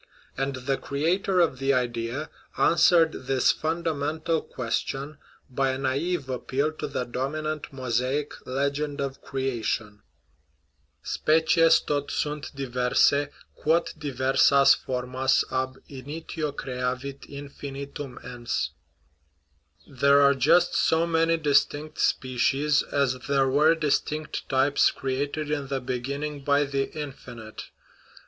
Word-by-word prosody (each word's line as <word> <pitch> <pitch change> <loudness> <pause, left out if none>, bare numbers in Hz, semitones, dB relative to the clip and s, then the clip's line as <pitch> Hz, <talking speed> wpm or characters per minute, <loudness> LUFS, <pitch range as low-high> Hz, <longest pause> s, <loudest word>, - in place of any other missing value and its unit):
And 135 0 -2
the 130 +2 -1
creator 180 +6 0
of 150 -6 +1
the 135 0 +2
idea 120 +3 -2 0.3
answered 165 -1 +5 0.2
this 135 -2 +3
fundamental 160 0 -1
question 135 +5 -4 0.3
by 135 +1 0
a - - -3
naive 140 +4 -1
appeal 135 +3 -1
to - - -3
the - - -2
dominant 150 +5 -3
Mosaic 130 +2 -1
legend 140 +2 -1
of 135 -1 -4
crea 135 -3 -3
tion: 105 -1 -3 0.5
" 70 0 -44
Species 160 +1 +4
tot 145 -1 -2
sunt 150 0 -2
diver 125 -2 -2
sae, 145 0 +4 0.2
quot 165 +2 +1
diver 135 -2 -2
sas 140 -1 +7
for 125 -1 -3
mas 130 +1 +2
ab 130 0 -2
initio 150 +3 -5
creavit 130 0 -4
infinitum 140 -1 -7
ens 120 -1 -3 0.6
" 75 0 -36
(There 140 0 +6
are 140 0 +6
just 160 +7 +3
so 165 +1 +2
many 165 0 +2
distinct 150 0 +1
species 135 +3 +2
as 135 -3 0
there 135 -1 +3
were 150 +5 +4
distinct 155 -1 -2
types 135 +2 +3
created 145 +3 -3
in 145 -2 -2
the 135 0 -2
beginning 140 +3 -4
by 145 +1 +3
the 140 -1 -2
Infinite). 120 -6 -8
140 Hz, 125 wpm, -26 LUFS, 130-150 Hz, 0.6 s, sas